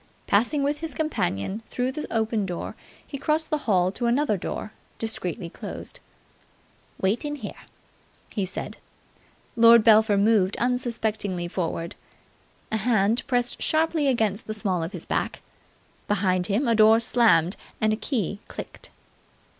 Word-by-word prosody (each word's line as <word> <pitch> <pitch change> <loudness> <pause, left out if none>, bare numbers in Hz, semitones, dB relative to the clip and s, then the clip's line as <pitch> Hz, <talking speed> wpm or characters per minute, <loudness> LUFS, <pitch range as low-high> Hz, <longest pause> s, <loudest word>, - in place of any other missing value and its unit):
Passing 245 +8 +2
with 290 +1 0
his 320 -5 -4
companion 210 - -2
through 250 +1 -1
the 300 +3 -6
open 220 -2 0
door, 175 -2 -5 0.3
he 280 - -7
crossed 315 +3 0
the 305 - +1
hall 185 -2 +3
to 240 +4 -2
another 245 -1 +2
door, 200 +3 -5 0.3
discreetly 180 -7 -3
closed. - - -8 1.0
"Wait 195 +8 +1
in 295 0 -3
here," 220 -8 -9 0.6
he 205 - -1
said. 185 - -5 0.8
Lord 230 -1 +7
Belpher 215 -2 +5
moved 200 -2 +3
unsuspectingly 220 -7 -1
forward. 170 -1 -3 0.8
A 220 - +1
hand 220 0 +2
pressed 245 -1 0
sharply 315 -1 +2
against 225 -3 0
the 215 - -3
small 195 -5 -1
of 165 +2 -3
his 180 -5 -8
back. - - -2 0.6
Behind 185 -3 +1
him 220 +7 +1
a 230 - +4
door 220 0 +6
slammed 225 -7 +3 0.2
and 215 0 +2
a - - +1
key 215 - -2
clicked. - - -9
220 Hz, 140 wpm, -25 LUFS, 195-245 Hz, 1.0 s, Lord